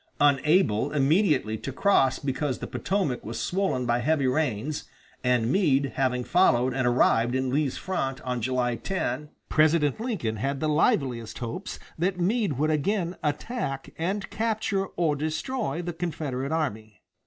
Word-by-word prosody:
Unable 145 - +3
immediately 145 - +2
to 135 - -5
cross 135 -4 +3
because 135 -1 -2
the - - -6
Potomac 185 -9 -1
was 115 - -5
swollen 185 -9 0
by 120 0 +1
heavy 145 +2 +1
rains, 135 0 -1 0.4
and 125 -2 +2
Meade 140 -8 +2
having 125 -2 0
followed 130 -7 +3
and 130 -1 0
arrived 120 0 +3
in 130 -1 0
Lee's 145 -1 0
front 135 -9 -2
on 125 -3 -3
July 125 0 0
10, 150 - -3 0.2
President 155 -1 +3
Lincoln 195 - -2
had 135 +5 -2
the 155 - 0
liveliest 125 -7 +1
hopes 125 - -5 0.2
that 180 +2 0
Meade 205 0 +1
would 150 +4 +1
again 175 +3 0
attack 150 - -3
and 195 +4 -2
capture 215 -3 -1
or 165 -5 0
destroy 160 - -2
the 175 0 -4
Confederate 150 -5 -3
army. 110 - -3
145 Hz, 145 wpm, -26 LUFS, 125-175 Hz, 0.4 s, Unable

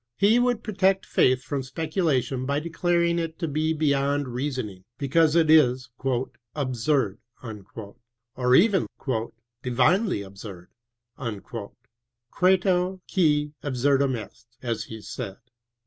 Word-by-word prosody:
He 215 +4 +5
would 245 -2 +1
protect 195 -2 +1
faith 130 0 +3
from 140 -2 -2
speculation 135 -2 -1
by 140 +1 +1
declaring 170 +1 +1
it 165 -1 -4
to 165 - -2
be 155 +2 0
beyond 145 -2 +1
reasoning, 125 -7 -4
because 150 +3 +3
it 165 -2 +4
is 130 -5 +4 0.3
" 120 -2 -20
absurd 130 -5 0
" - - -32 0.9
or 125 0 +3
even 190 +1 +4 0.7
divinely 130 - +2
absurd" 95 -2 -10 0.5
{credo, 115 -3 -5 1.4
^ia 150 -5 +2
ah 145 - -2
surdum 135 +1 +2
est), 110 - -24 0.2
as 115 -3 -2
he 110 0 -9
said. 95 - -6
140 Hz, 115 wpm, -25 LUFS, 125-165 Hz, 1.4 s, He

